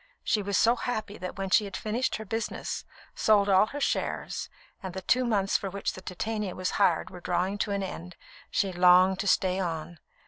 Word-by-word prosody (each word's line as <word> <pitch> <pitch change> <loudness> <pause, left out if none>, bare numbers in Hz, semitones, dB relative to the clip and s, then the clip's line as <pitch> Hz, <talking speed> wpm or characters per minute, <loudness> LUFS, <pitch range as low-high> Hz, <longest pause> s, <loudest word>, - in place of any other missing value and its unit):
She 215 - +1
was 200 -1 0
so 235 +2 +4
happy 220 -4 -4
that 185 0 -6
when 195 -1 -3
she 210 - +5
had 200 - -5
finished 230 +4 -1
her 220 - -6
business, 225 +3 -4 0.3
sold 205 -2 +3
all 195 +2 +5
her 290 - -6
shares, - - -2 0.3
and 190 -3 -6
the 190 - -5
two 255 +7 +3
months 205 -4 +2
for 195 - -5
which 200 +1 -3
the 185 - -9
Titania 205 +1 -3
was 185 0 -2
hired 175 -5 +2
were 180 -1 -10
drawing 180 +4 -1
to - - 0
an 200 -1 -1
end 180 -2 -7 0.3
she 195 -2 0
longed 180 +1 +5
to 200 - -2
stay 185 0 +2
on. 170 -2 -4
195 Hz, 205 wpm, -28 LUFS, 185-215 Hz, 0.3 s, she